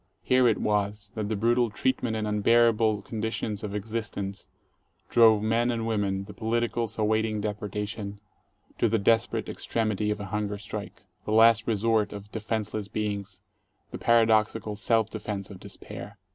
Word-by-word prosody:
Here 130 -1 +4
it - - +3
was 105 -1 -1
that 105 -2 -3
the 110 - 0
brutal 120 +3 +2
treatment 120 0 -1
and 110 -1 -2
unbearabe 110 0 +3
conditions 110 -1 -3
of 105 -1 -4
existence 105 -2 -4 0.6
drove 110 -3 +6
men 115 +2 +2
and 115 -2 -1
women, 100 -3 0
the 105 +1 -10
politicals 115 +1 -1
awaiting 110 0 +1
deportation, 105 0 -4 0.6
to 115 - +3
the 115 - +2
desperate 115 +3 +1
extremity 110 -2 -1
of 105 0 -1
a 100 - -5
hunger 105 0 -2
strike, 100 0 -7 0.2
the - - -3
last 110 0 +5
resort 110 -1 +1
of 100 +1 -9
defenseless 110 -1 -3
beings, 100 -2 -4 0.5
the - - -6
paradoxical 110 -2 +3
self 110 +1 +2
defense 105 -2 -5
of 95 - -10
despair. 100 0 -9
110 Hz, 145 wpm, -27 LUFS, 105-115 Hz, 0.6 s, drove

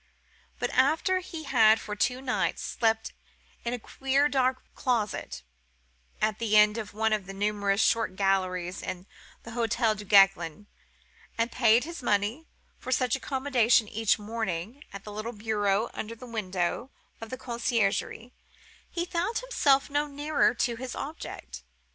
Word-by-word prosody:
But - - -2
after 320 +7 +2
he 335 -3 -8
had 225 -6 +5
for 210 - -6
two 250 +4 0
nights 260 -2 -1
slept 225 -1 0 0.5
in 235 - -2
a - - -5
queer 270 +4 +1
dark 260 -2 +1
closet, 215 - -2 0.8
at 215 -1 0
the 215 -2 +3
end 210 +1 +5
of 210 -1 -7
one 220 0 +1
of 205 -4 -2
the 195 - -7
numerous 205 0 +1
short 225 -5 +2
galleries 185 -2 0
in 180 0 -6 0.4
the 230 - -9
Hotel 230 -1 +1
Duguesclin, 195 -4 +3 0.7
and 230 +1 0
paid 235 -1 +4
his 335 0 -7
money 220 +7 0 0.3
for 255 - -6
such 255 0 +2
accommodation 260 -5 +2
each 220 0 +1
morning 220 - -4
at 200 0 -9
the 210 - -8
little 215 +3 -5
bureau 210 0 0
under 225 +2 -5
the 240 +3 -11
window 205 0 -2 0.3
of 225 - -7
the 255 - -5
conciergerie, 235 -1 -1 0.6
he 345 0 -2
found 355 +6 -1
himself 285 - +2
no 290 +1 0
nearer 290 -2 +1
to 235 0 0
his 255 0 -6
object. 170 - -7
225 Hz, 150 wpm, -28 LUFS, 205-260 Hz, 0.8 s, had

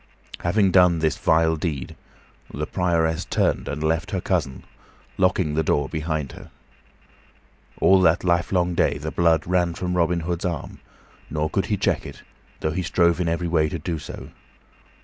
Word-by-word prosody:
Having 95 +2 +2
done 90 -2 +5
this 80 -1 +1
vile 80 0 +3
deed, 75 -5 -4 0.6
the 75 - -3
Prioress 85 -2 0
turned - - 0
and 75 +1 -4
left 80 +2 0
her 95 - -2
cousin, 85 -8 -2 0.6
locking 90 -4 +2
the 80 - +1
door 75 -2 +1
behind 80 -2 -3
her. - - -12 1.3
All 95 0 +5
that 85 0 +3
livelong 90 0 +1
day 85 - +1
the 75 +2 -5
blood 80 -3 +2
ran 90 -1 +1
from 90 -1 -3
Robin 85 0 +1
Hood's 85 +2 -3
arm, 85 -6 -4 0.5
nor 75 +1 -2
could - - 0
he - - 0
check - - 0
it, - - -11 0.4
though 80 - 0
he 90 +4 -2
strove 85 0 +2
in 85 - 0
every 85 +1 -1
way 80 -2 +2
to 85 - -4
do 80 +1 -4
so. - - -9
85 Hz, 170 wpm, -23 LUFS, 80-90 Hz, 1.3 s, done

